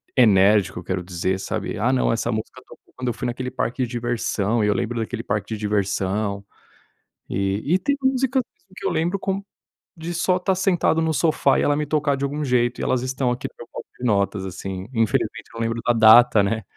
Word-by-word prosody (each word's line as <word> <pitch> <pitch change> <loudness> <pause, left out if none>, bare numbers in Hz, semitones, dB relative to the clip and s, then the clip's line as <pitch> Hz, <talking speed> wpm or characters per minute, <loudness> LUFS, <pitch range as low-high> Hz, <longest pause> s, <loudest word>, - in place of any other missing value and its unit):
enérgico, 105 -5 +4
eu - - -10
quero 90 0 -3
dizer, 95 +1 -2
sabe? - - -4
"Ah, 120 +5 +2
não, 130 - +2
essa 115 - -1
música 110 0 -5
tocou - - -18
quando 130 0 -5
eu 120 - +1
fui - - -6
naquele 125 +1 -3
parque 125 0 -2
de 120 - -3
diversão", 120 -2 -1
e - - +2
eu 105 - +3
lembro 120 +1 -2
daquele 115 +1 -4
parque 105 -1 -2
de - - -8
diversão, 100 0 -1 0.8
e 100 - -1
e - - +4
tem 285 +8 0
músicas 265 0 +1 0.3
que - - -5
eu - - +1
lembro 175 +5 0
como 195 +1 -3 0.5
de 165 +2 -5
só 180 +2 +1
estar 185 +1 0
sentado 175 -4 +2
no 160 0 +1
sofá 155 0 +2
e - - +1
ela 145 - +2
me 150 +1 -1
tocar 145 -1 +1
de 135 - -5
algum 145 +2 -2
jeito. 125 -1 +1
E - - -3
elas 130 - +1
estão 130 0 -1
aqui 125 - -3
no - - -33
meu 120 - -10
bloco - - -7
de 125 - -4
notas, 100 -3 +1
assim. 95 0 -6
Infelizmente, 115 -3 0
eu - - -14
não 115 - -5
lembro 115 0 -1
da - - +4
data, 115 0 +7
né. 110 +2 -1
120 Hz, 220 wpm, -22 LUFS, 105-145 Hz, 0.8 s, data